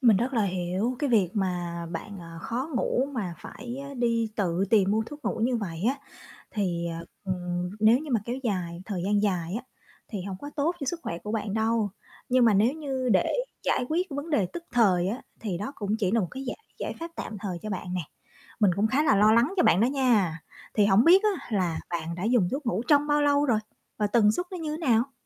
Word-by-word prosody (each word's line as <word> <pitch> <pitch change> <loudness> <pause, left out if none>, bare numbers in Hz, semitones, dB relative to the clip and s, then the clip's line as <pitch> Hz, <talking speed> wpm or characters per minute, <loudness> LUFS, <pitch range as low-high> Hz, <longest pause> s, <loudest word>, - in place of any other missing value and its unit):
Mình 235 -6 +6
rất 245 +7 0
là 225 - +3
hiểu 190 +6 -1
cái 290 -3 0
việc 200 -7 +4
mà 175 -4 -2
bạn, 195 +4 -6
ờ, 165 -1 -9
khó 250 - -3
ngủ 250 +1 +1
mà 190 -8 -3
phải 245 0 -8
á 280 - -8
đi 230 -2 +1
tự 185 -2 +1
tìm 200 -4 +4
mua 220 +2 +2
thuốc 295 +3 -10
ngủ - - -1
như 245 +1 +2
vậy 170 -7 -4
á, 265 - +2 0.6
thì, 175 -5 -1
à, 165 0 -4 0.2
ừm, 180 -1 -2
nếu 220 +3 +6
như 300 +1 -7
mà 235 -4 +2
kéo 240 +3 -3
dài 180 -7 -2
thời 190 -3 -3
gian 205 +1 +2
dài 180 -4 0
á 235 - -3 0.5
thì 205 -5 -4
hông 190 0 -5
có 290 - -7
tốt 320 +4 +1
cho - - -2
sức 335 +5 -2
khỏe 170 - -4
của 210 +4 -6
bạn 210 -2 -2
đâu. 220 -1 +1 0.4
Nhưng 255 -1 +4
mà 225 -3 +5
nếu 215 +6 +4
như 270 -4 -3
để 185 - +3 0.3
giải - - +1
quyết 345 +4 +1
cái - - -5
vấn 290 +3 -5
đề 215 - +2
tức 345 - -5
thời 190 -7 +4
á, 230 +6 -4 0.2
thì 195 -6 -3
đó 210 +8 -4
cũng 210 0 -1
chỉ 195 -5 +1
là 230 +2 +3
một 180 - -2
cái 265 +1 -6
giải 250 - -4 0.2
giải - - -3
pháp 335 +1 -5
tạm 220 - -5
thời 185 -4 -3
cho 215 - -4
bạn 180 -2 -4
nè. 180 - 0 0.6
Mình 205 -3 +5
cũng 205 +2 +3
khá 265 +6 +2
là 245 - +4
lo 210 +2 +6
lắng 240 - +3
cho 355 - +4
bạn 180 - +5
đó 230 - +5
nha. 240 - +2 0.4
Thì 210 -2 +4
hổng 200 +3 +5
biết 370 +4 +7
á 410 -4 0
là 170 -4 0
bạn 170 -1 -3
đã 180 +2 -4
dùng 225 -5 +3
thuốc 275 0 -3
ngủ 220 -1 0
trong 290 -1 +5
bao 295 0 +3
lâu 285 0 +3
rồi 230 -5 +3 0.4
và 210 - +2
tần 210 0 +4
suất 355 +10 -2
nó 365 - -4
như 315 -2 -3
thế - - -8
nào? 240 +2 +3
220 Hz, 245 wpm, -27 LUFS, 185-255 Hz, 0.6 s, biết